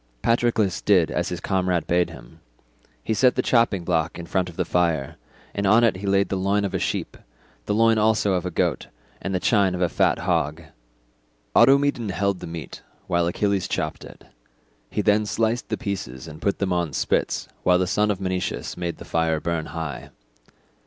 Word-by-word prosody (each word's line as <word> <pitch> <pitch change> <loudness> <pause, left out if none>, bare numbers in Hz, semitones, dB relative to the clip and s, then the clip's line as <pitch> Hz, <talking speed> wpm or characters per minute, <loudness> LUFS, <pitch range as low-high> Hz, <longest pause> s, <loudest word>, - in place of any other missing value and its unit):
Patroclus 115 -4 +1
did 90 -6 +3
as 90 - -1
his 90 - -4
comrade 90 -2 0
bade 90 0 +1
him; 80 +7 -13 0.6
he - - -1
set 125 +3 +3
the - - 0
chopping 115 -7 +2
block 85 -2 0
in 85 - -7
front 90 +1 -1
of 85 - -12
the 90 - -1
fire, 85 -6 0 0.4
and 100 0 -1
on 110 +4 +5
it 115 -5 +3
he 100 +2 -6
laid 100 0 +2
the - - -1
loin 100 +2 +1
of 100 - -4
a - - 0
sheep, - - -2 0.5
the 105 - +1
loin 115 0 +4
also 105 -2 +2
of 90 -2 0
a 90 - -2
goat, 85 - -1 0.3
and 95 -1 -2
the - - +1
chine 100 -2 +2
of 90 - -4
a - - +3
fat - - +2
hog. 75 +4 -1 0.9
Automedon 135 -2 +4
held 100 +1 -1
the - - -7
meat 80 -2 -8 0.2
while 85 -3 +1
Achilles 100 +1 0
chopped - - -3
it; - - -13 0.6
he 105 - -1
then 105 0 +3
sliced 115 +3 -1
the - - -1
pieces 90 - -5
and 75 -1 -10
put 100 - 0
them 95 -2 -1
on 85 -4 -1
spits - - 0
while 90 0 +4
the 95 - +1
son 105 +3 +1
of 100 -3 -1
Menoetius 95 -1 -3
made 85 -1 -4
the - - -10
fire 80 -1 0
burn 85 -1 -2
high. 80 -2 -6
95 Hz, 195 wpm, -24 LUFS, 85-105 Hz, 0.9 s, on